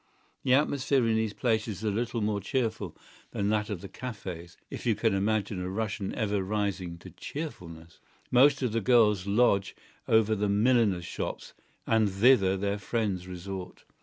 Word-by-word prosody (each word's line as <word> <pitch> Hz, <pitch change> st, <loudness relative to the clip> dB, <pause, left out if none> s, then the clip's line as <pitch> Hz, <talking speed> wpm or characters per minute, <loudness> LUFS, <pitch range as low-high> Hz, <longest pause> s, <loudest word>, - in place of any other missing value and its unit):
The 130 Hz, -1 st, +4 dB
atmosphere 140 Hz, -2 st, +2 dB
in 110 Hz, -, +2 dB
these 110 Hz, -1 st, -1 dB
places 110 Hz, -4 st, 0 dB
is 105 Hz, -, -10 dB
a 105 Hz, -, +1 dB
little 115 Hz, +2 st, -2 dB
more 105 Hz, -1 st, 0 dB
cheerful 110 Hz, -, -2 dB, 0.4 s
than 100 Hz, 0 st, 0 dB
that 105 Hz, 0 st, 0 dB
of 100 Hz, -5 st, -4 dB
the 100 Hz, -, -7 dB
cafÃ©s—if 95 Hz, -8 st, -8 dB
you 115 Hz, -3 st, +2 dB
can 110 Hz, -1 st, +1 dB
imagine 100 Hz, -1 st, 0 dB
a 90 Hz, -, -3 dB
Russian 100 Hz, -1 st, -3 dB
ever 105 Hz, -3 st, 0 dB
rising 95 Hz, -3 st, -2 dB
to -, -, -12 dB
cheerfulness. 85 Hz, -, -8 dB, 0.3 s
Most 140 Hz, +2 st, +5 dB
of 125 Hz, -, 0 dB
the 115 Hz, +1 st, 0 dB
girls 105 Hz, -5 st, +4 dB
lodge 100 Hz, -3 st, +2 dB, 0.3 s
over 110 Hz, -1 st, +4 dB
the 105 Hz, -1 st, 0 dB
milliners' 105 Hz, -4 st, +2 dB
shops, -, -, -5 dB, 0.3 s
and 110 Hz, -2 st, +3 dB
thither 95 Hz, -1 st, +4 dB
their 100 Hz, +1 st, -1 dB
friends 100 Hz, -3 st, -2 dB
resort. 90 Hz, 0 st, -7 dB
105 Hz, 165 wpm, -28 LUFS, 95-115 Hz, 0.4 s, Most